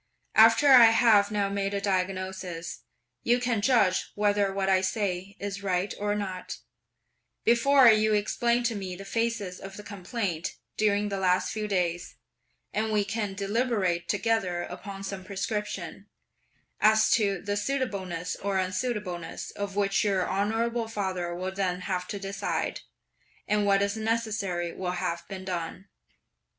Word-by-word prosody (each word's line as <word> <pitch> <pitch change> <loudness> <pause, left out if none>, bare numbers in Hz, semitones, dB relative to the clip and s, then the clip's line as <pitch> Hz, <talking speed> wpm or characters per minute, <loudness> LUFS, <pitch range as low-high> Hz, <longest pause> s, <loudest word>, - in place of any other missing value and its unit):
After 225 +6 +6
I 250 -3 +10
have 225 -3 +5
now 205 -1 0
made 200 0 -2
a - - 0
diagnosis, 185 -3 -3 0.4
you 240 +1 +2
can 240 -4 0
judge 205 -6 +2
whether 205 -1 +2
what 195 0 -1
I 190 -1 +4
say 190 -1 -2
is 200 0 -4
right 190 0 -1
or 205 0 0
not, 190 -3 -4 0.9
before 255 +3 +5
you 215 -1 +5
explain 235 +3 +1
to 235 -1 +1
me 190 -3 -5
the 195 +2 -9
phases 225 -4 -2
of 195 0 -9
the 210 - -8
complaint 195 -3 -4 0.2
during 205 -1 +1
the 195 -1 -3
last 185 0 +2
few 215 -1 -3
days, 175 -3 -1 0.6
and 220 +1 0
we 210 -1 +2
can 205 -1 -3
deliberate 200 -4 0
together 205 -5 0
upon 195 -1 -8
some 195 -1 -5
prescription; 205 +2 -4 0.7
as 220 0 +4
to 200 -4 +2
the 205 +3 -3
suitableness 200 -8 -2
or 195 -1 -1
unsuitableness 185 -2 -3
of 200 -1 -5
which 200 -1 +2
your 195 -3 +1
honourable 225 +4 0
father 185 -5 -3
will 185 +2 -3
then 185 -2 -2
have 180 -1 -3
to 205 - -4
decide, 195 0 -3 0.7
and 210 -1 +1
what 200 0 +4
is 200 +1 -1
necessary 220 -6 -1
will 180 -1 -3
have 170 -1 -3
been 190 -1 -7
done." 180 +2 -5
200 Hz, 145 wpm, -27 LUFS, 185-215 Hz, 0.9 s, I